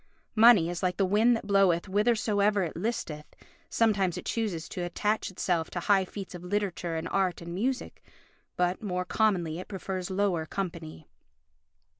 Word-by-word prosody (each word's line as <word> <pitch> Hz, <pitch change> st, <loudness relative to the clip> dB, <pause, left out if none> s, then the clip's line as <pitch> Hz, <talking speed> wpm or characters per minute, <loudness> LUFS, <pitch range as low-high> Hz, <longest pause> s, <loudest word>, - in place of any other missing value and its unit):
Money 220 Hz, -6 st, +7 dB
is 175 Hz, 0 st, -4 dB
like 180 Hz, -1 st, 0 dB
the 195 Hz, -, +3 dB
wind 215 Hz, +5 st, +4 dB
that 225 Hz, -, -9 dB
bloweth 195 Hz, -4 st, +3 dB
whithersoever 210 Hz, -1 st, +2 dB
it 165 Hz, -, -4 dB
listeth, 165 Hz, -7 st, -4 dB, 0.3 s
sometimes 195 Hz, -6 st, +1 dB
it 180 Hz, -, -7 dB
chooses 195 Hz, -8 st, -2 dB
to 180 Hz, -, -6 dB
attach 205 Hz, +5 st, -1 dB
itself 175 Hz, -3 st, -1 dB
to 175 Hz, -, -4 dB
high 195 Hz, +1 st, +3 dB
feats 195 Hz, 0 st, -8 dB
of 175 Hz, -1 st, -8 dB
literature 180 Hz, -3 st, -2 dB
and 160 Hz, +1 st, -3 dB
art 190 Hz, -2 st, 0 dB
and 170 Hz, 0 st, -7 dB
music, 250 Hz, +8 st, -3 dB, 0.5 s
but 180 Hz, +1 st, 0 dB
more 180 Hz, -3 st, -2 dB
commonly 180 Hz, -6 st, +1 dB
it 185 Hz, -, -8 dB
prefers 190 Hz, -2 st, -5 dB
lower 190 Hz, -4 st, 0 dB
company 165 Hz, -5 st, -5 dB
190 Hz, 160 wpm, -28 LUFS, 175-205 Hz, 0.5 s, Money